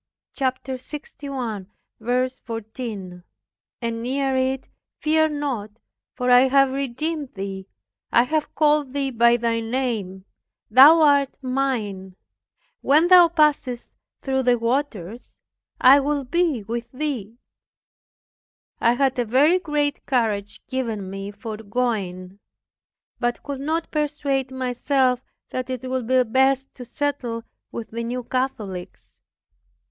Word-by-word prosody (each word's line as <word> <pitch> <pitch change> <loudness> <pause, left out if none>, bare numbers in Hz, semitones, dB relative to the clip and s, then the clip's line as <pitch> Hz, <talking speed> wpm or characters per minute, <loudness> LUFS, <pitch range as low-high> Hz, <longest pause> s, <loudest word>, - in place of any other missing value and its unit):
(Chap. 260 -2 -1
61:14) 240 - -5 0.6
and 230 -1 -2
near 265 +2 0
it, 260 0 0 0.3
"Fear 315 0 +3
not; 280 -8 -3 0.5
for 250 0 0
I 250 +2 +7
have 275 0 +4
redeemed 275 +2 -3
thee, 195 -1 -5 0.4
I 235 - +5
have 305 +4 -2
called 295 -3 +2
thee 275 -1 -1
by 235 0 +4
thy 230 -1 0
name; 225 -6 -3 0.5
thou 290 +8 +9
art 285 -2 +4
mine. 225 -8 -2 0.7
When 310 +5 +4
thou 360 -2 +9
passest 295 -7 +1 0.3
through 265 -1 0
the 245 -1 +3
waters, 230 -4 -3 0.4
I 270 +3 +8
will 285 0 -1
be 300 -3 0
with 235 +3 -5
thee." 255 -6 -4 1.4
I 235 - +4
had 265 0 +1
a - - +3
very 290 +10 +4
great 295 -4 -1
courage 215 -6 -1
given 225 -7 -3
me 195 +1 -5
for 210 +1 -7
going, 200 -5 -3 0.8
but 240 -1 -1
could 280 -2 -5
not 320 +3 -2
persuade 285 -3 -1
myself 260 0 +1 0.3
that 255 0 -3
it 255 0 -4
would 255 -2 -2
be 255 0 +4
best 265 +3 +1
to 250 - -10
settle 245 -3 -3 0.3
with 230 - -7
the 230 +1 -4
New 245 +2 -3
Catholics. 225 -8 -4
255 Hz, 120 wpm, -23 LUFS, 230-275 Hz, 1.4 s, thou